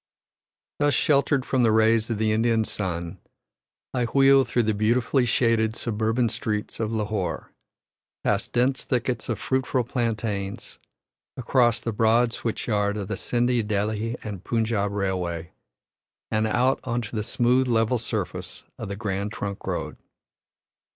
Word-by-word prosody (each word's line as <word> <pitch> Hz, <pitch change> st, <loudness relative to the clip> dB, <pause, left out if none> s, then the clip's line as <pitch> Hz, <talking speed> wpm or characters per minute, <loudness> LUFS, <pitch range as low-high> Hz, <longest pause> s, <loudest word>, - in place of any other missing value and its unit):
Thus 145 Hz, -1 st, +3 dB
sheltered 140 Hz, -3 st, +2 dB
from 130 Hz, -, +1 dB
the 115 Hz, -2 st, +4 dB
rays 110 Hz, +1 st, +3 dB
of 115 Hz, -, -1 dB
the 110 Hz, 0 st, +1 dB
Indian 115 Hz, +1 st, +2 dB
sun, 85 Hz, -5 st, -4 dB, 0.7 s
I 125 Hz, -2 st, +1 dB
wheel 135 Hz, +2 st, +5 dB
through 120 Hz, -2 st, 0 dB
the 110 Hz, 0 st, +1 dB
beautifully 120 Hz, +5 st, +2 dB
shaded 115 Hz, -2 st, +2 dB
suburban 115 Hz, +2 st, 0 dB
streets 105 Hz, -1 st, -3 dB
of 110 Hz, -1 st, -1 dB
Lahore, 105 Hz, -6 st, -2 dB, 0.7 s
past -, -, 0 dB
dense 130 Hz, +2 st, +1 dB
thickets 125 Hz, -2 st, -2 dB
of 115 Hz, -, 0 dB
fruitful 130 Hz, +1 st, 0 dB
plantains, 110 Hz, -5 st, -3 dB, 0.6 s
across 120 Hz, -2 st, +2 dB
the 115 Hz, -, -2 dB
broad 115 Hz, +2 st, +3 dB
switch 115 Hz, -, -3 dB
yard 105 Hz, -2 st, 0 dB
of 100 Hz, -1 st, -5 dB
the 105 Hz, -, -1 dB
Scinde, 120 Hz, +1 st, 0 dB
Delhi 110 Hz, +2 st, -1 dB, 0.2 s
& 95 Hz, -2 st, -8 dB
Punjab 110 Hz, -3 st, 0 dB
Railway, 90 Hz, -5 st, -2 dB, 0.8 s
and 110 Hz, 0 st, +1 dB
out 125 Hz, +4 st, +2 dB
on 120 Hz, -1 st, -1 dB
to 110 Hz, -, -7 dB
the 105 Hz, -, 0 dB
smooth, 125 Hz, +4 st, +2 dB
level 115 Hz, +1 st, +2 dB
surface -, -, -4 dB, 0.2 s
of -, -, -5 dB
the 100 Hz, -, -4 dB
Grand 100 Hz, -1 st, -3 dB
Trunk 100 Hz, -2 st, -5 dB
Road. -, -, -3 dB
110 Hz, 145 wpm, -25 LUFS, 105-120 Hz, 0.8 s, wheel